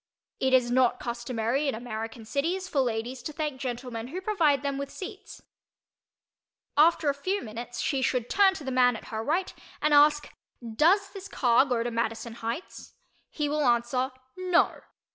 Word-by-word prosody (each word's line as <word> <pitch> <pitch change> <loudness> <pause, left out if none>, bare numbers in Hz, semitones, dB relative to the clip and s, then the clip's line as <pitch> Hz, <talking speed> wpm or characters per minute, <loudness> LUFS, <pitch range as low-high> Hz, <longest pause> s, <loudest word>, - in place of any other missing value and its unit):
It 265 - +1
is 245 -2 +4
not 250 -1 +3
customary 240 +3 -2
in 275 - 0
American 225 0 -6
cities 335 - -1
for 300 - -1
ladies 245 +1 -2
to 280 - -5
thank 295 -3 -4
gentlemen 245 -2 -4
who 335 +8 -5
provide 335 -9 +2
them 280 -1 -2
with 280 0 -4
seats. 405 +1 -9 1.3
After 315 +1 +4
a 285 - +3
few 370 +9 -2
minutes 235 +2 -7
she 270 -2 0
should 250 -2 0
turn 390 +3 +4
to 315 - -7
the 265 - -4
man 250 -2 +4
at - - -10
her 220 0 -3
right 340 +9 -1 0.3
and 300 0 +2
ask 295 0 +4 0.3
"Does 335 - +2
this 395 -1 -8
car 250 - +3
go 245 -4 0
to 240 - -3
Madison 230 0 -2
Heights?" 235 +9 -6 0.3
He 300 -2 -2
will 300 +1 0
answer 245 +1 +1 0.3
"No." 365 -1 +1
265 Hz, 170 wpm, -27 LUFS, 235-305 Hz, 1.3 s, is